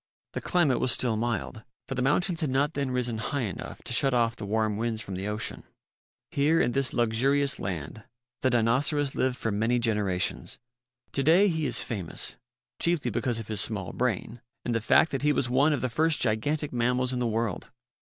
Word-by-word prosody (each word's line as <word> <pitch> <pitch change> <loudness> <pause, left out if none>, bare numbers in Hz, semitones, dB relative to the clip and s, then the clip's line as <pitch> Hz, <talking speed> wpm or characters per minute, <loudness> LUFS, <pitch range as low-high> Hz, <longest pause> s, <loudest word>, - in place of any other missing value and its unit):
The - - -3
climate 150 -9 +2
was 130 - +2
still 120 -1 +2
mild, 110 -1 -2 0.3
for 135 - -3
the 130 - -2
mountains 165 +6 +1
had 155 - 0
not 135 +3 +1
then 140 -1 -1
risen 120 -3 -1
high 140 +3 -2
enough 100 -5 -6
to - - -2
shut 135 -2 +3
off 115 -1 +2
the 105 - -7
warm 110 0 +1
winds 115 0 -1
from 100 -3 -6
the 95 +2 -4
ocean. 105 +1 -3 0.7
Here, 150 +4 +3
in 120 - +2
this 135 0 0
luxurious 135 +5 +1
land, 90 +3 -5 0.4
the 130 - +3
Dinoceras 135 +5 +2
lived 130 -1 0
for 110 - -2
many 110 +4 +1
generations. 105 -6 0 0.5
To 140 - 0
day 175 +8 +5
he 160 -3 -1
is 120 -1 +1
famous, 100 -8 -2 0.4
chiefly 170 -3 +1
because 120 -4 -1
of 115 -1 -6
his 105 -2 0
small 100 -6 -3
brain 120 -1 -2 0.2
and 120 - 0
the 115 - 0
fact 115 +8 +4
that 135 - -2
he 150 +1 +3
was 125 -4 0
one 140 +5 +4
of 145 - 0
the 130 - +1
first 155 +5 +1
gigantic 140 +7 0
mammals 125 +1 +1
in 125 - -1
the 120 - 0
world. 115 -3 -2
125 Hz, 200 wpm, -27 LUFS, 110-140 Hz, 0.7 s, day